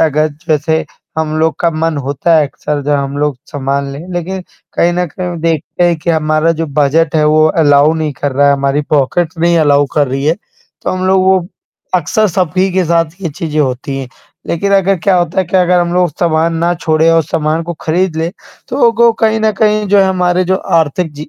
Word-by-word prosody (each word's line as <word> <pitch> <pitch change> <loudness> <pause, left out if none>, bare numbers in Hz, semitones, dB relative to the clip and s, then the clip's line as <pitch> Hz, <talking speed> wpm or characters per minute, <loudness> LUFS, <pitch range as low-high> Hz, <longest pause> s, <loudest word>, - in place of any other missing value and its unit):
अगर 155 -1 +2 0.2
जैसे 160 +1 +1 0.3
हम 155 -1 -1
लोग 160 0 +1
का 170 - +2
मन 160 0 -1
होता 145 +4 +1
है 150 -2 +3
अक्सर 145 +1 -4
जब 145 +1 -1
हम 140 0 -3
लोग 145 -2 0
सामान 140 -1 -2
लें 140 - -7
लेकिन 185 +2 -4 0.3
कहीं 175 - +2
न 180 +1 -1
कहीं 175 +2 -5
देखते 165 +1 -1
हैं 175 -1 +2
कि 170 - -1
हमारा 155 0 +1
जो 165 - -1
बजट 155 +3 +2
है 155 - +3
वो 155 +1 +4 0.2
अलाउ 145 +1 +4
नहीं 155 -2 -2
कर 140 0 -3
रहा 140 +1 +3
हमारी 140 +1 0
पॉकेट 155 +4 +1
नहीं 170 +1 +2
अलाउ 145 -2 +3
कर 145 -3 +2
रही 135 +2 -3
है, 160 - +3 0.5
तो - - -1
हम 185 0 -2
लोग 190 0 +3
वो 190 -2 +2 0.5
अक्सर 185 +5 +1
सभी 185 +1 0
के 185 0 +1
साथ 170 0 +2 0.2
ये 180 - -2
चीज़ें 155 +1 -3
होती 135 0 -2
हैं, 135 -2 -6 0.4
लेकिन 200 +4 -1
अगर 195 0 +2
क्या 185 +2 +2
होता 175 +1 -1
है 190 - +2
कि 185 - 0
अगर 180 0 +3
हम 175 0 -1
लोग 180 -2 +2
सामान 165 -1 +1
ना 170 +1 +1
छोड़े 160 -1 +1
और 165 0 +3
सामान 155 +1 -1
को 175 +1 -5
खरीद 170 +1 -1
ले 160 +1 -1 0.4
तो 245 -2 +3
वो 235 -1 +6
कहीं 220 0 +2
न 220 0 +2
कहीं 215 -1 +2
जो 200 +1 +4
है 195 - +5
हमारे 180 -1 +1
जो 190 +1 +1 0.2
आर्थिक 160 +2 -2
जी 150 +1 -8
165 Hz, 215 wpm, -13 LUFS, 150-180 Hz, 0.5 s, वो